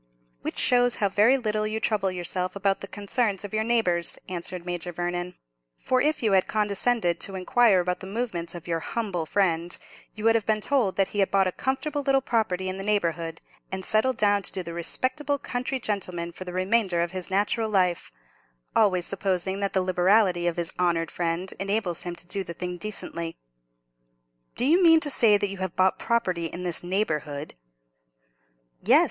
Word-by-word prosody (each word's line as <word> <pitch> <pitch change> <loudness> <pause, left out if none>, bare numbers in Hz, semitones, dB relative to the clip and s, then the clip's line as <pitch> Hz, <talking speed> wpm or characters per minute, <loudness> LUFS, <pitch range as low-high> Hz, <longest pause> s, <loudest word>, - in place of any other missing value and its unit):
"Which - - -5
shows 245 -1 +4
how 200 - +1
very 215 +7 +4
little 215 -3 -1
you 215 +1 -2
trouble 210 -3 +1
yourself 180 +1 -3
about 195 0 0
the 195 - -6
concerns 205 0 -1
of 205 - -8
your 215 0 +1
neighbours," 220 -7 +1
answered 180 0 -5
Major 175 0 -4
Vernon, 175 +1 -3 0.4
"for 255 0 +1
if 305 -3 +1
you 220 - +3
had 190 -1 +3
condescended 210 -3 +1
to 195 - -4
inquire 190 +1 +3
about 180 0 -2
the 190 - -8
movements 190 -6 -3
of 175 - -9
your 165 -1 -1
humble 180 -4 -3
friend, 175 -3 0 0.4
you 215 - -8
would 225 0 +5
have 225 -3 0
been 215 -1 +2
told 230 -4 +1
that 195 -1 +1
he 205 - -4
had 195 - +3
bought 195 -1 +3
a 185 - 0
comfortable 290 - -2
little 275 -1 +3
property 210 -7 -1
in 185 +1 -4
the - - -4
neighbourhood, 170 -5 -1 0.3
and 190 -1 -3
settled 225 +3 +3
down 205 -1 +3
to - - 0
do 185 - -4
the 170 - -7
respectable 260 - -1
country 255 0 -3
gentleman 180 -6 -3
for 185 +2 -8
the 180 - -6
remainder 185 -1 +1
of 170 0 -1
his 185 -1 -5
natural 210 +3 +1
life—always 175 - -1
supposing 190 0 -1
that 200 -1 -1
the 190 - +2
liberality 185 0 +3
of 175 - -1
his 170 -1 -2
honoured 170 -2 +1
friend 175 +2 -1
enables 195 -3 -1
him 175 -1 -4
to 175 - -6
do 195 +2 -2
the 170 -2 -8
thing 180 +1 -4
decently." 170 -5 -3 1.2
"Do 245 - +1
you 335 +7 +4
mean 325 -2 +7
to 290 - +5
say 220 -5 +5
that 205 0 -1
you 195 - -6
have 185 -2 -3
bought 185 0 +2
property 185 -8 0
in 175 +2 -7
this 175 -2 +1
neighbourhood?" 155 -6 -2 1.3
"Yes! - - +6
190 Hz, 190 wpm, -26 LUFS, 175-220 Hz, 1.3 s, mean